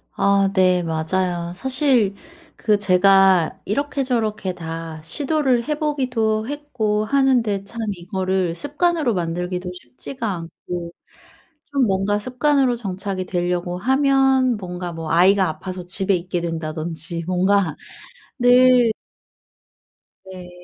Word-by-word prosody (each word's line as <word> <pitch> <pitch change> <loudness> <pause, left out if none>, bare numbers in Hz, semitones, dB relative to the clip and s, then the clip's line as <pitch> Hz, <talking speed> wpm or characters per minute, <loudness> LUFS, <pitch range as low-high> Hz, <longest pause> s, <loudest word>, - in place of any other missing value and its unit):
아 200 0 +3
네, 185 -2 +3
맞아요. 170 +2 -2
사실 255 -3 +1 0.4
그 210 -2 +2
제가 190 -2 +4
이렇게 280 +6 -1
저렇게 220 -7 -1
다 165 -2 -7
시도를 265 - 0
해보기도 255 -8 -1
했고 245 -8 -2
하는데 240 -6 +2
참 215 +4 -9
이거를 185 -1 -2
습관으로 295 - 0
만들기도 180 +1 -3
쉽지가 180 - -6
않고 170 0 -7 0.8
좀 275 -4 +2
뭔가 195 +1 0
습관으로 255 +2 +1
정착이 195 -3 -4
되려고 175 0 -2
하면 265 +1 +2
뭔가 180 -2 -6
뭐 165 -1 -6
아이가 185 +3 +4
아파서 185 +2 -7
집에 190 +2 0
있게 175 0 -3
된다든지 165 0 -4
뭔가 185 -2 +1 0.6
늘 245 -1 +5 1.4
네 180 -1 -10
195 Hz, 240 characters per minute, -21 LUFS, 180-250 Hz, 1.4 s, 늘